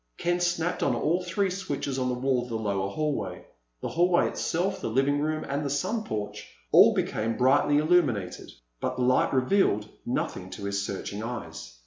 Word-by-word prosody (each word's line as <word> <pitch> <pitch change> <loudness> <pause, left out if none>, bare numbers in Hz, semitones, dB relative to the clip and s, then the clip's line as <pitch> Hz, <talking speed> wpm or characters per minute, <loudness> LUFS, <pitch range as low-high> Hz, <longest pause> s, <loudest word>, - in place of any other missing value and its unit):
Ken 175 0 0
snapped 175 -1 0
on 130 - +2
all 165 +9 +1
three 185 +2 0
switches 145 -8 -3
on 130 - 0
the 125 - 0
wall 130 0 +1
of 125 - -8
the 115 - -2
lower 100 -3 -1
hallway. 150 +6 -3 0.4
The - - -3
hallway 175 +1 +3
itself, 185 +4 -1
the - - -2
living 135 +5 +2
room, 155 +1 -1
and 140 +2 -2
the 140 - -2
sun 215 +11 -1
porch 105 -1 -5 0.2
all - - +7
became 115 +1 -1
brightly 135 +3 +4
illuminated. 145 - +1 0.3
But 130 - -2
the 125 - -1
light 130 +1 +3
revealed 130 - +2 0.2
nothing 95 -6 -3
to 105 - -8
his 100 0 -1
searching 100 +1 -5
eyes. 115 - -6
135 Hz, 180 wpm, -27 LUFS, 115-170 Hz, 0.4 s, all